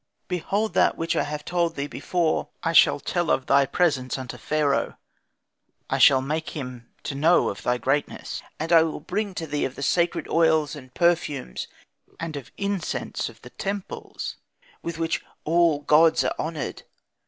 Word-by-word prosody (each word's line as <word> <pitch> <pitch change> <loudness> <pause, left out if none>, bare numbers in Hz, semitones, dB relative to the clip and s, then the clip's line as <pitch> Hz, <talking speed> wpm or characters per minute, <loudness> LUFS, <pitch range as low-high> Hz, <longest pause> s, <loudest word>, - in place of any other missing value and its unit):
'Behold 195 +3 -1
now - - +4
that - - +3
which 165 0 -1
I - - +2
have 150 0 -4
told 170 -2 0
thee 140 - -2
before. 170 +2 -1 0.2
I 165 - 0
shall 160 - +6
tell 175 +3 -1
of 130 - +2
thy 140 -1 +4
presence 140 -8 +1
unto 130 -2 -6
Pharaoh, 150 -2 0 0.9
I - - +1
shall 130 -1 +7
make 155 +3 -3
him 125 -4 -7
to - - -3
know 160 +6 +4
of 100 - -6
thy 125 0 +1
greatness, 140 +4 -2 0.2
and 160 +2 -3
I 165 - +8
will 160 -1 -1
bring 195 +5 -3
to 165 - -3
thee 145 -1 -2
of 130 - -2
the 140 - -5
sacred 170 +5 +1
oils 160 -2 +3
and 130 -3 -11
perfumes, 160 - 0 0.5
and 165 -2 -4
of 140 -4 -7
incense 200 -3 -2
of - - -17
the - - -11
temples 200 -1 -5 0.4
with 170 -1 -5
which 165 0 -1 0.2
all 165 -2 +3
gods 155 +2 +5
are - - 0
honoured. 160 -1 -3
160 Hz, 175 wpm, -25 LUFS, 140-170 Hz, 0.9 s, I